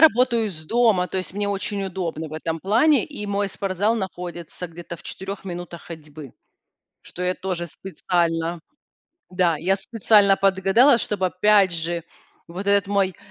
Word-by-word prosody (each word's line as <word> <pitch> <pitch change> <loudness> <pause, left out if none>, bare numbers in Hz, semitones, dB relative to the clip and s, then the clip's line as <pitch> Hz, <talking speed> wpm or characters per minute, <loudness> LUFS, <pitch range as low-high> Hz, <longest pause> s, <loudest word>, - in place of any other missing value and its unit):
работаю 250 -6 +5
из 160 -6 -7
дома, 220 -3 +3
то 190 - -2
есть 185 +1 -6
мне 205 0 -1
очень 200 0 -2
удобно 170 -4 -4
в - - -13
этом 160 0 -3
плане, 240 +10 +3
и 280 -9 -7
мой 200 0 0
спортзал 200 +3 0
находится 180 -4 -5
где-то 170 0 -9
в - - -17
4 195 +1 -7
минутах 175 -2 -7
ходьбы. 150 -4 -10 0.7
Что 180 - -7
я 180 - +1
тоже 180 -2 -3
специально 170 -1 -2 0.7
Да, 180 -3 +2
я 185 +5 +1
специально 205 -1 +3
подгадала, 195 +7 +4
чтобы 195 -4 -1
опять 195 +1 +4
же 170 0 -3 0.4
вот 185 +4 -7
этот 200 0 +3
мой, 195 -3 +1
190 Hz, 155 wpm, -23 LUFS, 170-205 Hz, 0.7 s, работаю